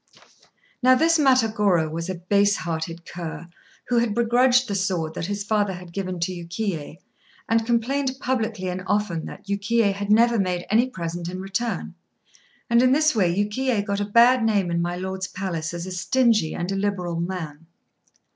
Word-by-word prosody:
Now 255 +1 +6
this 330 +4 +3
Matagorô 215 - +3
was 165 +3 -4
a 185 - -2
base 200 +3 +2
hearted 165 -1 -4
cur, 170 -1 -7 0.4
who 240 -1 +3
had 230 -3 0
begrudged 245 +2 +3
the 205 - -3
sword 185 -5 -1
that 165 - -4
his 205 0 -3
father 205 -2 0
had 180 -1 -10
given 185 -2 -4
to 170 - 0
Yukiyé, 170 -2 -4 0.5
and 225 0 +1
complained 260 +3 0
publicly 225 -7 -2
and 180 +1 -3
often 200 -6 -1
that - - -10
Yukiyé 200 +1 +1
had 200 +1 -3
never 230 +1 +4
made 180 -2 -1
any 235 +4 +3
present 170 -4 -5
in 185 +1 -6
return; 195 +5 -3 0.7
and 235 0 +4
in 255 0 +4
this 310 -1 +3
way 185 -5 +3
Yukiyé 210 +3 0
got 200 -1 -2
a 205 - -1
bad 235 +4 +5
name 200 -5 +1
in 170 0 0
my 175 +1 -2
Lord's 190 +1 -4
palace 175 -5 -4
as 170 0 -5
a 185 - -6
stingy 215 -1 +1
and 175 +2 -3
illiberal 195 -4 -2
man. 165 -3 -5
200 Hz, 175 wpm, -23 LUFS, 175-230 Hz, 0.7 s, Now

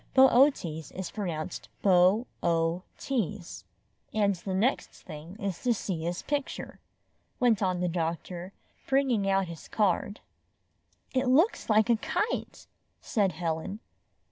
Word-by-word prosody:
Bootes 265 -2 +6 0.2
is 190 -1 -6
pronounced 175 -7 -4
Bo 190 +4 +5 0.2
o 165 +1 +1 0.2
tease. 200 - -3 0.5
''And 200 -2 +3
the 190 -2 -1
next 230 +8 +1 0.2
thing 160 +2 -9
is 200 -5 -3
to 245 -2 +2
see 175 -6 -3
his 175 +1 -3
picture," 285 -2 -3 0.6
went 235 -5 +3
on 185 -2 +1
the 180 - +1
doctor, 170 +2 -3 0.4
bringing 260 -7 +2
out 195 0 +3
his 165 -2 -9
card. 205 0 0 0.9
"It 260 0 +1
looks 310 - +3
like 215 +2 +4
a 230 - +4
kite," 420 - -2 0.3
said 200 -6 0
Helen. 165 +4 -3
195 Hz, 125 wpm, -29 LUFS, 175-235 Hz, 0.9 s, Bootes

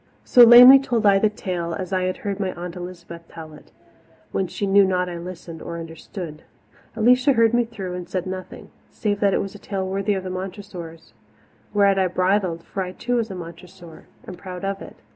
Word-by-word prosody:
So 245 - +5
lamely 245 +3 +10
told 240 -5 -1
I 200 -1 +5
the 215 - +3
tale, 175 -5 -4
as 190 -1 -6
I 185 -1 0
had 185 0 -2
heard 200 -1 -3
my 190 -2 -1
Aunt 175 0 -7
Elizabeth 170 -2 -9
tell 160 -1 -11
it, 150 - -17 0.6
when 190 - -1
she 200 - -4
knew 200 +1 +5
not 180 -1 0
I 175 -1 -6
listened 170 -2 -9
or 170 - -6
understood. 165 0 -8 0.5
Alicia 250 +5 +4
heard 230 -1 +3
me 240 0 +2
through 195 -6 -7
and 180 -1 -7
said 185 -2 -3
nothing, 185 0 -8 0.2
save 205 -2 -2
that 200 -2 +2
it - - 0
was 195 - -8
a 205 - -12
tale 195 -2 -4
worthy 195 +2 -1
of 190 - -4
the 185 - -5
Montressors. 185 -3 -8 0.6
Whereat 200 -1 +4
I 190 - +2
bridled, 185 -2 0
for 195 - -5
I 180 -1 -5
too 245 +4 -2
was 230 -1 -1
a 190 - -6
Montressor, 170 0 -12 0.2
and 180 - -10
proud 185 0 -7
of 195 0 -3
it. - - -11
185 Hz, 210 wpm, -22 LUFS, 175-205 Hz, 0.6 s, lamely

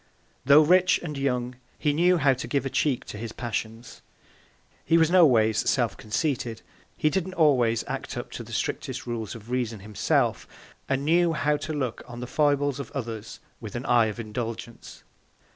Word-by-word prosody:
Tho' 140 +3 +7
rich 180 +3 +4
and 150 -3 -5
young, 125 -3 -2 0.2
he 150 - +1
knew 175 +4 +3
how 140 -4 +4
to 130 - -6
give 140 -1 -1
a 135 - -3
Check 135 -5 0
to 105 - -8
his 115 0 -5
Passions; 115 0 -5 0.8
he 165 - +3
was 160 0 +3
no 180 -3 +7
ways 110 -4 +2
self 115 -6 +1
conceited; 115 0 -2 0.3
he 155 - +2
didn't 185 +1 -2
always 125 -8 +3
act - - -5
up - - -6
to - - -6
the - - -13
strictest - - -3
Rules 115 -3 -4
of 115 +1 -11
Reason 120 -5 -2
himself, 105 -1 0 0.4
and 135 +1 0
knew 170 +1 +3
how 150 0 +1
to 155 +2 -5
look 130 -6 -3
on 120 0 -9
the 125 - -4
Foibles 145 0 +1
of 140 - -6
others, 115 -4 -6 0.2
with 110 -2 -8
an 120 +3 -4
Eye 120 -2 +4
of 110 +2 -5
Indulgence. 115 +1 -6
125 Hz, 180 wpm, -26 LUFS, 115-150 Hz, 0.8 s, Tho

